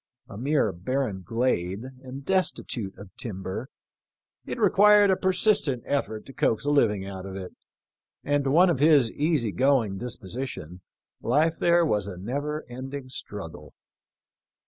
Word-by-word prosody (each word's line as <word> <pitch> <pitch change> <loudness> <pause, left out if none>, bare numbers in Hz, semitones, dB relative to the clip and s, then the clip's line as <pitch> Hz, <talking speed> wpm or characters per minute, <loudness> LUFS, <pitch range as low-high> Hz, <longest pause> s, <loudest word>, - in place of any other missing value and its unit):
A - - -10
mere 135 -1 +1
barren 100 +2 -2
glade, 110 -3 -1 0.2
and 135 +1 -9
destitute 125 - -1
of 100 -1 -13
timber, 100 +2 -5 0.8
it - - -4
required 205 0 +6
a - - +4
persistent 185 - +1
effort 110 -7 -2
to 135 - -11
coax 115 +1 0
a 145 - +2
living 105 -9 +2
out 95 -1 -7
of 95 - -7
it; 95 -2 -7 0.7
and 145 0 +1
to - - +1
one 175 +6 +5
of 155 - -1
his 145 -6 +5
easy 150 -7 +1
going 125 -6 +2
disposition, 115 - -4 0.4
life 155 +7 +2
there 170 0 +4
was 105 - 0
a 95 -3 -7
never 145 - -3
ending 130 +2 -7
struggle. 90 - -8
130 Hz, 145 wpm, -26 LUFS, 100-145 Hz, 0.8 s, required